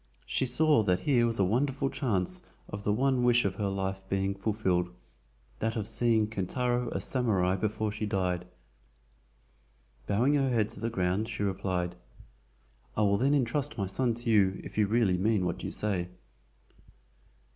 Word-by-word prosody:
She 130 - 0
saw 155 -1 +4
that 90 -3 +1
here 120 -5 +3
was 115 0 -2
a 100 - +3
wonderful 135 +6 0
chance 100 -9 -1 0.3
of 100 0 -7
the 105 - +1
one 130 +3 +2
wish 120 -1 +4
of 95 - -1
her 105 - -1
life 95 0 -2
being 95 0 0
fulfilled—that 90 - -3
of 110 -3 -2
seeing 115 0 +2
Kintaro 120 +4 -1
a - - -2
SAMURAI 95 -5 +1
before 110 0 -1
she 105 0 -3
died. 90 -3 -1 1.6
Bowing 120 +8 +2
her 135 -2 +2
head 110 -4 +1
to - - -9
the 115 +2 -1
ground, 95 +1 -1
she 105 -2 -3
replied: 95 -2 -1 1.0
"I - - +2
will 100 -1 +3
then 140 +4 +3
intrust 130 -2 0
my 100 - 0
son 115 +5 0
to 120 0 -1
you 95 -3 +3
if - - -10
you 105 -1 +3
really 105 -4 +2
mean 105 -1 +2
what 90 - -3
you - - -3
say." 95 -5 -1
105 Hz, 165 wpm, -29 LUFS, 95-120 Hz, 1.6 s, saw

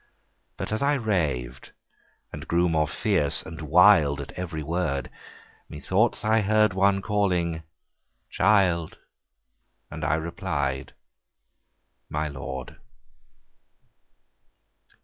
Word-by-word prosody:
But - - -5
as 110 - -2
I 145 +1 +2
rav'd 75 - -2 0.6
and - - -8
grew 85 +1 +2
more 80 -2 +1
fierce 85 -3 0
and 80 0 -9
wild 80 -2 +5
At 70 - -7
every 85 -4 -5
word, 75 -5 -2 0.6
Me 75 - -8
thoughts 105 +7 0
I 110 +1 +3
heard 110 0 +3
one 100 +1 +2
calling, 90 -6 0 0.7
Child: 95 -5 +2 0.9
And 75 +1 -7
I 70 +2 +2
reply'd, 75 -5 -3 1.1
My 75 +1 -2
Lord. 65 -2 -7
85 Hz, 100 wpm, -25 LUFS, 75-100 Hz, 1.1 s, wild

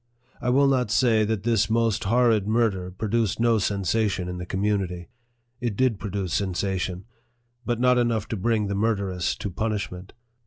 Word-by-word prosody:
I 125 - -1
will 135 +3 +4
not 130 -4 +1
say 115 -1 +3
that 105 -2 -2
this 115 -3 +2
most 115 -3 +1
horrid 115 -2 +3
murder 110 -5 +1
produced 110 +3 -1
no 115 -1 +3
sensation 100 -1 0
in 90 0 -5
the 90 - -6
community. 95 -3 -2 0.5
It 120 -4 -2
did 125 -6 +2
produce 100 -3 -3
sensation, 95 -1 -2 0.6
but 120 -1 0
not 125 0 +4
enough 115 -3 0
to - - -2
bring 110 +1 0
the 100 - -2
murderess 100 -4 0
to 100 - -5
punishment. 100 -2 -4
105 Hz, 160 wpm, -25 LUFS, 95-115 Hz, 0.6 s, will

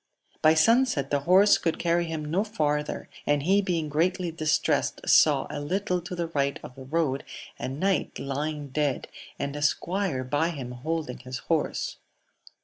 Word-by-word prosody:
By 155 +1 +5
sunset 230 - +3
the 145 - +2
horse 195 +3 +6
could 165 - -1
carry 170 0 +1
him 160 -2 -4
no 170 +7 +1
farther, 150 -8 -2 0.2
and 145 -1 +2
he 195 +5 +4
being 170 -5 -1
greatly 170 +4 0
distressed, 155 -2 0
saw - - +5
a - - -4
little 180 +4 -1
to 175 +1 -6
the 170 -1 -3
right 140 -3 0
of - - -9
the 135 0 -11
road 140 -2 0 0.4
a - - -3
knight 185 +8 -1
lying 145 +1 -3
dead, 145 -1 -1 0.3
and 140 0 -3
a 145 - -4
squire 170 -1 0
by 145 +6 0
him 135 -7 -6
holding 150 +1 -4
his 130 +1 -6
horse. 160 +4 -1
155 Hz, 165 wpm, -27 LUFS, 140-175 Hz, 0.4 s, horse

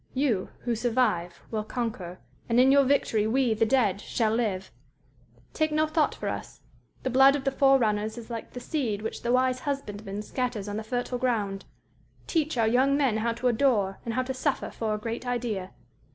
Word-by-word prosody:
You 255 -8 +1
who 240 - -1
survive 220 -7 0
will 215 -1 -1
conquer, 215 -6 -4 0.3
and 230 +1 +3
in 260 +1 +6
your 280 0 +6
victory 240 -6 +2
we, 250 0 +2
the 220 +1 +1
dead, 215 -6 +2
shall 220 -2 0
live_.... 195 -5 -1 0.8
"_Take 310 -1 +1
no 310 +1 +2
thought 310 0 +1
for - - -5
us; - - -5 0.4
the 260 - -1
blood 270 +2 +6
of 280 - -3
the 270 - +1
forerunners 230 -6 +2
is 235 - -8
like 230 -1 -6
the 250 - -5
seed 240 -7 -2
which 220 - -4
the 240 - -1
wise 255 0 +2
husbandman 210 -8 -4
scatters 245 -3 -3
on 205 0 -3
the 220 - -4
fertile 245 +2 -2
ground_.... 210 -6 0 0.7
_Teach 310 -4 0
our 225 - +3
young 260 +4 +3
men 265 -7 +2
how 230 +1 0
to 240 +2 -1
adore 220 -6 +2
and 230 - -3
how 255 - +1
to 265 +1 -3
suffer 265 +2 -1
for 220 -2 -2
a - - -3
great 230 +3 -5
idea. 230 -6 -2
235 Hz, 195 wpm, -27 LUFS, 215-260 Hz, 0.8 s, in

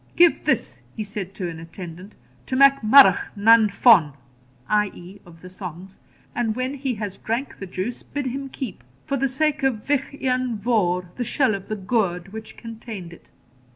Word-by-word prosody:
'Give 345 -1 +4
this,' - - 0 0.2
he 215 - -2
said 200 -2 -6
to 185 -3 -3
an 165 -1 -7
attendant, 175 +3 -10 0.3
'to 260 - -2
Mac 275 +1 +6
Murrough 270 +6 +7
nan 220 +1 +5
Fonn 200 - +5 0.5
(i.e. 200 -2 -2
of 165 -1 -16
the - - -9
songs), 185 0 -9 0.3
and 225 -3 -1
when 255 +2 -2
he 265 -3 -3
has 205 -2 -6
drank 235 +5 -3
the 195 - -6
juice, 190 +7 -4
bid 285 -1 -5
him 270 +2 -4
keep, 225 - -7 0.2
for 275 - -1
the 275 +1 +1
sake 290 +2 0
of 255 -6 0
Vich 280 -2 0
Ian 255 -3 -1
Vohr, 180 -5 0
the 250 - -1
shell 245 0 +1
of 195 0 -6
the 215 - -3
gourd 195 -3 -1
which 220 0 -9
contained 220 -6 -8
it.' - - -17
215 Hz, 180 wpm, -23 LUFS, 185-255 Hz, 0.5 s, Murrough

